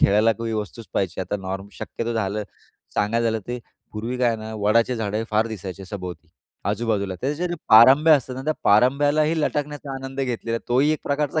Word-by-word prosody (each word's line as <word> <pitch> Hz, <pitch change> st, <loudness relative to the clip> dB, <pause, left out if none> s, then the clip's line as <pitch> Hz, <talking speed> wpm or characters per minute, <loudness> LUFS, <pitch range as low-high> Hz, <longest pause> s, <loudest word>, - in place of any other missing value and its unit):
खेळायला 105 Hz, +3 st, +5 dB
काही 115 Hz, 0 st, -4 dB
वस्तूच 110 Hz, +1 st, -5 dB
पाहिजे. 95 Hz, -1 st, -1 dB
आता 95 Hz, +2 st, -2 dB
नॉर्म 95 Hz, +1 st, -5 dB
शक्यतो 115 Hz, +4 st, -4 dB
झालं 105 Hz, -1 st, -1 dB, 0.5 s
सांगायचं 115 Hz, +3 st, +1 dB
झालं 110 Hz, -1 st, +1 dB
ते 125 Hz, 0 st, -3 dB, 0.3 s
पूर्वी 115 Hz, +4 st, -4 dB
काय 120 Hz, -2 st, +2 dB
ना 110 Hz, 0 st, -7 dB
वडाचे 115 Hz, +4 st, +2 dB
झाडं 110 Hz, 0 st, -2 dB
फार 110 Hz, +1 st, +2 dB
दिसायचे 95 Hz, -3 st, -7 dB
सभोवती 90 Hz, -3 st, -7 dB, 0.4 s
आजूबाजूला. 105 Hz, -5 st, -1 dB
त्याचे 150 Hz, +7 st, -1 dB
जे 175 Hz, -, -2 dB
पारंब्या 135 Hz, +8 st, +8 dB
असतात 130 Hz, -2 st, -1 dB
ना 130 Hz, -, -5 dB
त्या 155 Hz, -, +1 dB
पारंब्यालाही 145 Hz, +8 st, +3 dB
लटाकण्याचा 145 Hz, -2 st, -2 dB
आनंद 135 Hz, 0 st, -5 dB
घेतलेला. 115 Hz, -3 st, -2 dB
तोही 130 Hz, +5 st, +3 dB
एक 155 Hz, -, -1 dB
प्रकारचा 145 Hz, +2 st, 0 dB
115 Hz, 175 wpm, -23 LUFS, 105-135 Hz, 0.5 s, पारंब्या